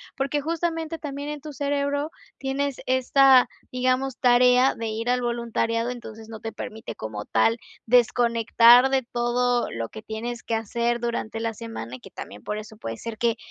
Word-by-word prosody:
porque 275 +2 -1
justamente 330 +1 -2
también 285 -1 -5
en 300 -1 -5
tu 300 +1 -8
cerebro 285 +2 -1 0.3
tienes 275 0 -2
esta, 260 0 +5 0.2
digamos, 255 +1 0
tarea 250 +1 +5
de 225 -1 -4
ir 225 +2 -3
al 250 0 +2
voluntariado, 235 -1 -1
entonces 225 -3 -8
no 220 -1 -8
te 225 +1 -5
permite 220 +1 -7
como 105 -1 -6
tal 225 +1 +2 0.3
desconectar 240 +1 +5
de 270 -1 +3
todo 240 0 0
lo 115 0 -4
que 220 - -10
tienes 225 +2 -5
que - - -3
hacer 235 +2 0
durante 235 -2 -3
la 225 0 -2
semana, 165 - -7
que - - -14
también 105 +1 -9
por 210 0 -3
eso 215 0 -11
puede 115 - -6
ser 230 -1 -6
que 230 0 +1
240 Hz, 170 wpm, -25 LUFS, 225-270 Hz, 0.3 s, esta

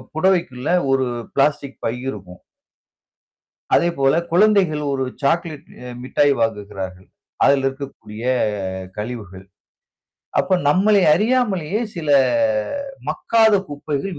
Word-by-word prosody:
புடவைக்குள்ள 160 -7 0 0.2
ஒரு 135 -1 +2 0.3
plastic 140 -1 0
by 115 - 0 0.2
இருக்கும். 95 -6 -9 1.3
அதே 170 - +3
போல 135 0 +3 0.2
குழந்தைகள் 185 -5 +3
1 135 -1 -1 0.2
சாக்லேட் 160 0 -1 0.2
அ - - -7 0.2
மிட்டாய் 145 +2 +2
வாங்குகிறார்கள். 100 -4 -4 0.4
அதில் 140 -1 +4
இருக்கக்கூடிய 135 -5 -7 0.7
கழிவுகள். 105 -4 -7 1.0
அப்ப 185 0 +1
நம்மளை 195 +6 +4
அறியாமலேயே 210 -3 0
சில, 165 -4 -5 1.0
மக்காத 225 -1 +3 0.2
குப்பைகள் 145 +4 -4
145 Hz, 95 wpm, -20 LUFS, 125-180 Hz, 1.3 s, அதில்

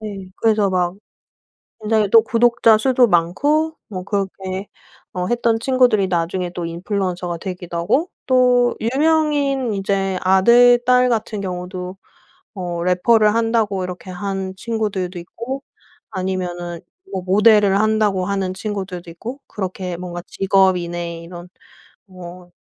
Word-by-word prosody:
네. 200 -3 -7
그래서 215 -3 +2
막 180 -1 0 0.9
굉장히 215 -2 +1
또 225 -1 +7
구독자 230 -1 +4
수도 255 +1 +3
많고 285 - +1
뭐 185 -3 -6
그렇게 195 -1 -3 0.5
어 180 0 -3
했던 235 -1 +1
친구들이 245 -6 +3
나중에 175 +1 -1
또 175 - -4
인플루언서가 180 0 -3
되기도 180 -2 -6
하고 225 - 0 0.2
또 250 -1 +3
유명인 280 -1 +1
이제 195 -1 -1
아들 235 +6 +5
딸 250 0 +4
같은 220 -3 -2
경우도 180 0 -5 0.6
어 175 -2 -4
래퍼를 210 +4 +3
한다고 225 -4 0
이렇게 180 +1 -8
한 190 +1 -4
친구들도 200 -5 -3
있고 235 +10 -7 0.5
아니면은 180 -3 -4 0.3
뭐 185 - -3
모델을 205 +1 +4
한다고 215 -4 +1
하는 195 -1 -2
친구들도 190 -4 -5
있고 235 +11 -8
그렇게 185 -2 -5
뭔가 175 0 -6
직업인의 175 -3 0
이런 175 +1 -10 0.6
뭐 180 -1 -11
195 Hz, 275 characters per minute, -20 LUFS, 180-230 Hz, 0.9 s, 또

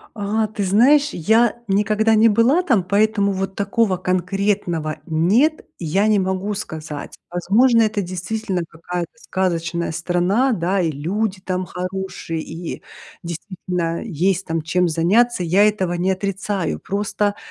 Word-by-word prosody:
А, 215 +1 0
ты 210 -1 -4
знаешь, 265 +10 +4
я 225 +6 +2
никогда 215 +2 +2
не 225 +1 +6
была 235 - +3
там, 235 - +2
поэтому 200 +1 +2
вот 195 0 -3
такого 200 -1 +1
конкретного 180 -3 -1
нет, 205 - +2
я 185 +5 +1
не 215 -2 +3
могу 190 +2 -1
сказать. 155 -6 -6 0.2
Возможно, 225 +7 +3
это 215 -1 0
действительно 185 +1 -3
какая-то 170 +1 -5
сказочная 170 -5 -2
страна, 180 +10 +1
да, 185 -2 0
и 165 - 0
люди 185 +7 -2
там 185 -1 -2
хорошие, 180 -3 -5
и 165 +2 -7 0.4
действительно 170 -1 -4
есть 190 -1 0
там 165 0 -1
чем 180 +3 +1
заняться, 180 +6 +2
я 190 +5 +4
этого 190 -4 0
не 180 +2 0
отрицаю, 195 -1 -2
просто, 205 +1 -1
190 Hz, 135 wpm, -20 LUFS, 175-215 Hz, 0.4 s, не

